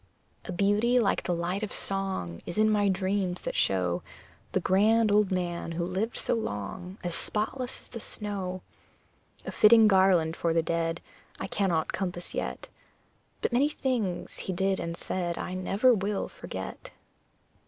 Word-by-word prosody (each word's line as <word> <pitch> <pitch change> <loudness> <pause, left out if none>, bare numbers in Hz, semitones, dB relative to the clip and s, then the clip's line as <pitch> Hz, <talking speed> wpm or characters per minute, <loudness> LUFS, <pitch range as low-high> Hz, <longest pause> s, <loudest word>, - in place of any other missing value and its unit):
A - - -5
beauty 205 +6 +3
like 220 - +2
the 175 - -1
light 175 +4 -2
of 215 - -3
song 190 - -2
Is - - -3
in 215 0 +4
my 205 -1 +3
dreams, 190 -1 0
that - - -4
show 90 -2 +1 0.5
The - - +1
grand 215 +4 +3
old 205 -1 +4
man 175 -2 -2
who 170 +1 -1
lived 190 +6 -2
so - - 0
long 180 - -4
As 175 -1 -2
spotless 245 +8 -3
as - - -13
the 230 - -7
snow. 195 -4 -4 0.8
A - - -4
fitting 220 0 +7
garland 185 -5 +4
for 170 -1 0
the 165 0 +2
dead 165 0 -1 0.4
I - - -3
cannot 175 -6 0
compass 180 -2 -4
yet; 65 0 -4 0.8
But - - 0
many 275 +5 +4
things 245 -11 -2
he 190 - -3
did 190 +2 +1
and 170 0 -4
said 175 -2 -2
I 185 - -4
never 195 +7 +3
will 200 -1 -1
forget. - - -7
190 Hz, 160 wpm, -28 LUFS, 175-210 Hz, 0.8 s, fitting